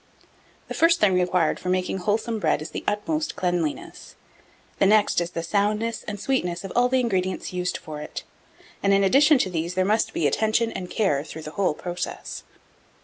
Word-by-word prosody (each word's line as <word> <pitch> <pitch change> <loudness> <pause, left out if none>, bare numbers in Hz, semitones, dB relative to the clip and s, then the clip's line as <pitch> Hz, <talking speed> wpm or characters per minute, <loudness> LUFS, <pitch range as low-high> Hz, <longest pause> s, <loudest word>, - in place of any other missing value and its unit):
The - - -5
first 335 +1 +4
thing 205 -3 +4
required 180 -2 +1
for 180 - -4
making 185 +1 0
wholesome 220 +4 -1
bread 155 -6 +1
is 155 - -8
the - - -5
utmost 310 +10 -1
cleanliness; 175 -4 -3 0.6
the 195 - +5
next 210 -3 +4
is 170 - -2
the 165 -2 -4
soundness 210 +5 0
and 205 -1 -5
sweetness 180 -9 -1
of 195 - -6
all 245 +1 +4
the 260 0 +2
ingredients 190 -7 -1
used 180 0 -1
for 150 -1 -8
it; - - -7 0.6
and, 200 0 +3
in 195 - +3
addition 280 +9 +5
to 190 - 0
these, 170 +1 -3
there 185 0 +2
must 215 +3 +1
be 160 - -1
attention 220 - +1
and 180 -1 -6
care 150 -10 +1
through 160 0 -9
the 155 - -7
whole 180 -3 0
process. 175 +1 -5
190 Hz, 190 wpm, -24 LUFS, 175-220 Hz, 0.6 s, the